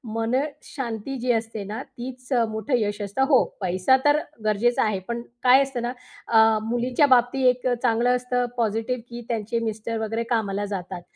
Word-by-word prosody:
मनशांती 255 0 -3
जी 245 +1 +1
असते 225 -2 -3
ना 215 +5 -5 0.2
तीच 255 +1 -8 0.2
मोठं 220 +4 -1
यश 205 -1 -2
असतं 205 +7 -1
हो 260 - +6 0.2
पैसा 185 +7 +3
तर 290 +1 +5 0.3
गरजेचा 215 +3 +2
आहे. 210 -3 0
पण 235 0 -3 0.2
काय 255 +2 +7
असतं 265 -3 -4
ना 240 - -1 0.4
अ, 220 -1 +5
मुलींच्या 245 +4 +2
बाबतीत 255 +1 +3 0.2
एक - - +3 0.2
चांगलं 245 +1 +3
असतं 250 0 -1
पॉझिटिव्ह 225 +2 -1
की 240 0 -7
त्यांचे 230 0 -1
मिस्टर 220 +1 -4
वगैरे 225 +2 -2
कामाला 205 -2 -1
जातात. 180 -1 -5
235 Hz, 160 wpm, -24 LUFS, 215-250 Hz, 0.4 s, काय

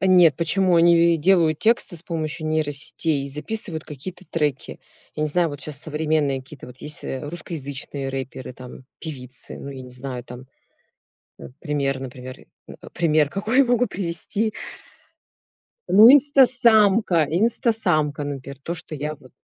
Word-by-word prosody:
Нет, 180 -6 +5
почему 180 +1 +2
они, 170 0 +5
э, - - +1
делают 160 -2 +3
тексты 225 -5 +1
с 160 - -10
помощью 155 -2 -4
нейросетей 150 -1 -1
и - - -6
записывают 160 +2 -4
какие-то 165 +6 -9
треки. 150 -5 -2 0.4
Я 155 - -2
не 155 - 0
знаю, 170 +2 +1
вот 145 -1 -8
щас 150 -1 -6
современные 150 -3 -1
какие-то 140 -1 -13
вот 125 +1 -13
есть, 150 0 -5
э, 130 - -4
русскоязычные 140 -4 -6
рэперы, 130 -1 -6
там 125 +1 -12
певицы 130 -5 -7
ну, 140 - -8
я 130 -1 -8
не 125 - -11
знаю 125 0 -6
там. 125 +1 -11 0.9
Э, - - -10
пример, 140 -4 -1
например, 130 -1 -8 0.3
э - - -11 0.2
пример 155 -3 +2
какой 215 - -1
я 275 - +7
могу 245 0 +2
привести? 200 +4 -2 1.4
Ну 215 +6 +8
Инстасамка. 235 - +5
Инстасамка, 175 - +1
например, 140 -1 -6
то, 170 - -3
что 165 -2 -8
я 150 +2 -4
вот 130 - -19
155 Hz, 150 wpm, -22 LUFS, 140-185 Hz, 1.4 s, Ну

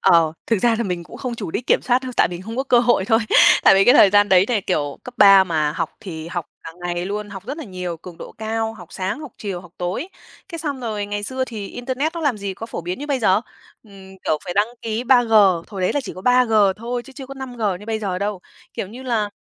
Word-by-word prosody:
Ờ. 165 -2 +4
Thực 225 - +2
ra 235 +3 +3
là - - +1
mình 180 -3 -3
cũng - - -12
không 250 -2 -4
chủ 210 -7 -6
đích 245 - -4
kiểm - - +3
soát 250 +1 +2
đâu, 255 -1 -5
tại - - +4
mình 175 +1 -7
không 225 +4 -7
có 265 - +1
cơ 250 -3 +4
hội 235 -5 +3
thôi. 225 +2 +3 0.4
Tại - - +7
vì 195 - +5
cái 245 - +6
thời 195 - +7
gian 205 0 +4
đấy 185 0 +5
thì 225 -4 0
kiểu 145 -7 -2
cấp 250 - -9
3 195 -2 +8
mà 155 -4 0
học - - -3
thì 165 -7 -7
học 175 -4 -4 0.2
cả - - -8
ngày 175 +1 -2
luôn, 205 +1 -4
học 195 -2 -8
rất 280 +5 -5
là 320 - -6
nhiều, 180 -4 -5
cường 170 +1 -12
độ - - -9
cao, 225 0 -2
học 175 -5 -13
sáng, 190 +8 -3
học 300 -5 -9
chiều, 195 -4 -4
học 175 - -15
tối. 180 - -3 0.4
Cái 335 - -7
xong 290 -5 -4
rồi 210 -4 -3
ngày 205 0 -4
xưa 260 +4 -2
thì 215 -5 -7
internet 265 +6 -3
nó 335 - -4
làm 285 -8 0
gì 195 -1 -4
có 225 - -7
phổ 225 - -5
biến 180 +5 -5
như 290 - -6
bây 280 -3 0
giờ, 200 -3 +3 0.4
ừm, 190 -3 -14
kiểu, 155 - +1
phải 175 - -5
đăng 205 +2 +3 0.2
ký 225 +2 -3
3G, 245 -3 +4 0.4
hồi 195 -4 -7
đấy 185 - +1
là 290 - 0
chỉ 240 - -7
có 185 - -9
3G 250 -2 +3 0.2
thôi 240 +2 -4
chứ 270 - -14
chưa 265 0 -9
có 275 - -8
5G 250 -4 -7 0.2
như 210 - -12
bây 220 -1 -1
giờ 190 -4 -3
đâu. 200 -2 -3 0.3
Kiểu - - -3
như 240 +5 -10
là, 230 -5 0
210 Hz, 275 wpm, -21 LUFS, 185-245 Hz, 0.4 s, 3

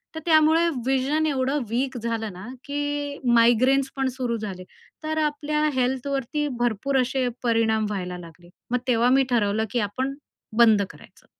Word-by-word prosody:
तर - - -3
त्यामुळे 320 +1 +4 0.2
व्हिजन 270 +4 +1
एवढं 275 0 0
वीक 255 +3 -1
झालं 225 -2 -3
ना, 185 +3 -10 0.2
की 290 0 -3 0.2
मायग्रेन्स 255 +4 +4
पण 270 -1 +1
सुरू 240 -3 -1
झाले. 195 -4 -6 0.4
तर 315 0 -2
आपल्या 300 0 -1
हेल्थवरती 265 +3 -1
भरपूर 240 +3 0
असे 255 0 -1 0.2
परिणाम 225 -2 +2
व्हायला 180 -3 -4
लागले. 175 0 -13 0.2
मग 250 - +2
तेव्हा 240 0 +3
मी 270 +1 +5
ठरवलं 220 -1 +1
की 245 - 0
आपण 260 +6 -3 0.4
बंद 220 -3 +6
करायचं. - - -17
255 Hz, 145 wpm, -24 LUFS, 225-280 Hz, 0.4 s, बंद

